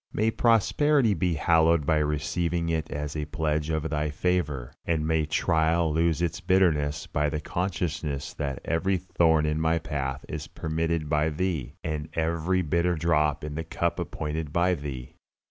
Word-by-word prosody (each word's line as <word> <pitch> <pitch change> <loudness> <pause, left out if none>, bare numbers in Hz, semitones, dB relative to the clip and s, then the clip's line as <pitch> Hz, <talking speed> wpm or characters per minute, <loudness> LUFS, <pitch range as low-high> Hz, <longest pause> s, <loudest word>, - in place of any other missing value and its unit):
May 110 +2 +1
prosperity 120 +3 +3
be 90 -1 0
hallowed 80 -1 +3
by 80 +1 +3
receiving 80 +3 -1
it 80 -1 -1
as 75 +1 -4
a 75 -1 -2
pledge 75 0 -1
of 80 -1 -1
Thy 75 0 0
favor, 75 -5 -1
and 80 -2 0
may 80 -1 +1
trial 80 0 +2
lose 80 0 +1
its 85 -1 -2
bitterness 75 -6 +2
by 75 0 0
the 75 0 -2
consciousness 80 -4 -3
that 70 -3 -4
every 95 +4 +1
thorn 80 -4 +2
in 75 +1 0
my 80 +1 +2
path 70 -4 -3
is - - -5
permitted 80 0 -2
by 75 +1 +2
Thee, 75 -5 -2
and 75 -2 -3
every 85 +3 0
bitter 85 +3 +1
drop 75 -3 +1
in 75 0 -4
the 80 +2 -3
cup - - -2
appointed 75 0 -4
by 85 +3 +2
Thee. 70 -6 -6
80 Hz, 160 wpm, -27 LUFS, 75-85 Hz, -, prosperity